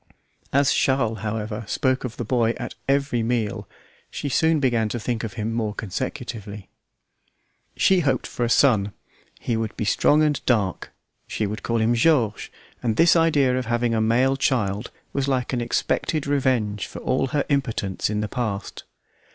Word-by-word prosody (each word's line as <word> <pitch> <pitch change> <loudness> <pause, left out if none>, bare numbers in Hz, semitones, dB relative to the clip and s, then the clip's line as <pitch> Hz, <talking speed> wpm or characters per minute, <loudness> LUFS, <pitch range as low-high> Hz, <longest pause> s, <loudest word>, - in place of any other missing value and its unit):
As 140 0 +3
Charles, 115 -5 +1
however, 105 +1 -3
spoke 130 +2 0
of 120 -3 -5
the 120 - -3
boy 115 0 +1
at - - -6 0.2
every 140 -3 +1
meal, 110 -3 -1 0.4
she 145 - -4
soon 160 +3 +2
began 120 -5 +1
to 120 - -3
think 115 0 -2
of 110 -3 -4
him 110 0 -3
more 110 -3 -2
consecutively. 105 -2 -5 1.1
She 190 -1 +4
hoped 135 -6 0
for 120 - -3
a 120 - 0
son; 110 -7 +3 0.5
he 120 - -2
would 110 -1 -3
be 110 - -2
strong 150 +8 +3
and 150 -2 0
dark; 105 -7 +1 0.4
she 110 - -2
would 105 +2 -4
call 115 - -1
him 115 +1 +2
George; 120 -4 +2 0.3
and 115 -3 0
this 170 +8 +5
idea 145 -6 +3
of 130 -2 -2
having 120 0 +1
a 110 - +1
male 125 +5 +2
child 110 -6 0 0.2
was 140 -1 -1
like 130 -2 -1
an 120 - 0
expected 140 +5 -1
revenge 125 -7 0
for - - -10
all 130 +1 0
her 145 +2 -1
impotence 115 -11 -1
in 105 0 -1
the 105 - -2
past. 110 -5 -4
120 Hz, 170 wpm, -23 LUFS, 110-135 Hz, 1.1 s, this